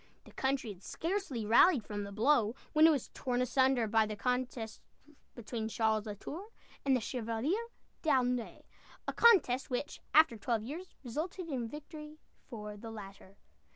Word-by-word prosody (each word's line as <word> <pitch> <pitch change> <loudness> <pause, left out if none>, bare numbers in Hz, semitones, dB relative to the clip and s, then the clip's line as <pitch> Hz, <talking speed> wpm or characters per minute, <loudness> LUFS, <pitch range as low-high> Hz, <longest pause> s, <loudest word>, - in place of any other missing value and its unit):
The - - -16
country 265 -5 -1
had 180 - -19
scarcely 325 - -3
rallied 235 - +5
from 205 -1 -4
the 200 - -8
blow, 225 +1 +3 0.2
when 310 +1 +7
it - - +7
was 290 -6 0
torn 245 -1 -1
asunder 255 -1 +3
by 220 0 +3
the 215 - -4
contest 250 0 -2 0.5
between 225 -1 -4
Charles 220 -1 +1
la 210 - -4
Tour 335 - -7 0.4
and 270 -1 +3
the - - +2
Chevalier 250 - -2 0.3
D'Aulnay 250 -6 0 0.4
a - - -1
contest 345 - +5
which, 255 +3 -3
after 310 -6 +6
twelve 225 0 -1
years, 320 +10 -7
resulted 330 +8 -4
in 250 -5 -2
victory 300 +1 -9 0.3
for 210 -4 -7
the 225 +2 -8
latter. 195 -2 -10
245 Hz, 155 wpm, -33 LUFS, 220-300 Hz, 0.5 s, when